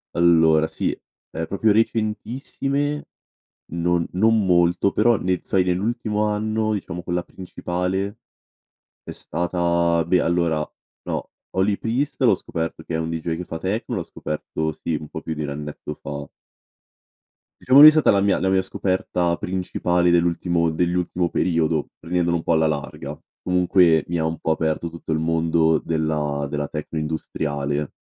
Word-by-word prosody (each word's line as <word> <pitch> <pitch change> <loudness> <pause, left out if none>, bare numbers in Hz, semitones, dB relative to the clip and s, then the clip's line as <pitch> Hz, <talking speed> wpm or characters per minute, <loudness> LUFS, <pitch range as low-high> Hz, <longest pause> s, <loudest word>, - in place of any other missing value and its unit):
allora, 80 -2 +4
sì, - - -1 0.4
è 80 0 -4
proprio 105 +2 +2
recentissime, 130 +7 -1 0.7
non 85 0 +1
non 110 +3 +3
molto, 85 +2 +3
però, 115 +4 +3
nel 90 -2 -1
fai 95 -1 +2
nell'ultimo 105 +3 -1
anno, 110 +1 0
diciamo, 90 -4 -5
quella 90 0 -1
principale, 95 +3 -4 0.9
è - - -8
stata 85 -1 0
beh, 90 +2 +3
allora, 85 -2 +1 0.4
no, - - -3 0.3
Holy 100 +2 +2
Priest 125 +5 -2
l'ho - - +5
scoperto 80 -1 -5
che - - -5
è - - 0
un 80 0 -2
deejay 80 0 -2
che 90 - -4
fa 80 - -6
techno, 105 +7 -2
l'ho 90 - -3
scoperto, 80 0 -4
sì, 80 +1 -4
un 75 0 -5
po' - - -6
più 80 - -4
di 75 - -4
1 75 - -3
annetto 75 +1 -6
fa. 70 0 -6 1.3
Diciamo 130 +2 +6
lui 150 +1 +13
è - - +5
stata 155 -1 +4
la 100 - +3
mia 100 -1 +2
la 95 - +1
mia 95 0 +3
scoperta 90 -2 -1
principale 90 -1 0
dell'ultimo 85 0 +2
dell'ultimo 90 +1 0
periodo, 80 -3 0
prendendolo 85 0 0
un 80 - -6
po' - - +1
alla 80 0 +3
larga. 75 -2 -4 0.2
Comunque, 90 -3 +3
mi 85 - -1
ha 80 - 0
un 80 -1 -2
po' 80 - 0
aperto 80 +1 -1
tutto 85 0 -7
il 80 - +1
mondo 80 0 +2
della 75 -3 -1
della 75 0 -2
techno 75 +1 -5
industriale. 75 -2 -3
85 Hz, 155 wpm, -22 LUFS, 80-95 Hz, 1.3 s, lui